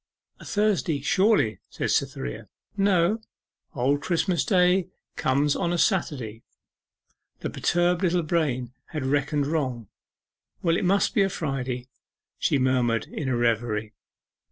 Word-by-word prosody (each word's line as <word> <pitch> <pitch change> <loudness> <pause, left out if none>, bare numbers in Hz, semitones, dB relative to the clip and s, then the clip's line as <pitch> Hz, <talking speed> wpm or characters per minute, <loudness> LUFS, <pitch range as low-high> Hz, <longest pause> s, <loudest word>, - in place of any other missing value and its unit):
'A - - -12
Thursday, 205 -8 +1
surely?' 185 - +2
said - - -2
Cytherea. 60 -1 -2 0.3
'No: 195 +1 +2 0.5
Old 140 +3 +1
Christmas 175 +3 +1
Day 180 -2 +3 0.3
comes 140 +2 +1
on 175 -2 0
a 175 - 0
Saturday.' 135 - 0 1.0
The - - -3
perturbed 175 +1 +1
little 180 -2 +2
brain 140 -7 -1
had 150 -5 -4
reckoned 145 +1 +1
wrong. 130 -8 -2 0.7
'Well, 165 -2 +3
it 180 - 0
must 195 +2 +2
be 220 - +3
a 195 - +3
Friday,' 130 -7 -3 0.5
she - - +2
murmured 125 -3 +1
in 140 -4 -3
a 125 - +1
reverie. 110 -2 0
150 Hz, 130 wpm, -25 LUFS, 125-180 Hz, 1.0 s, Day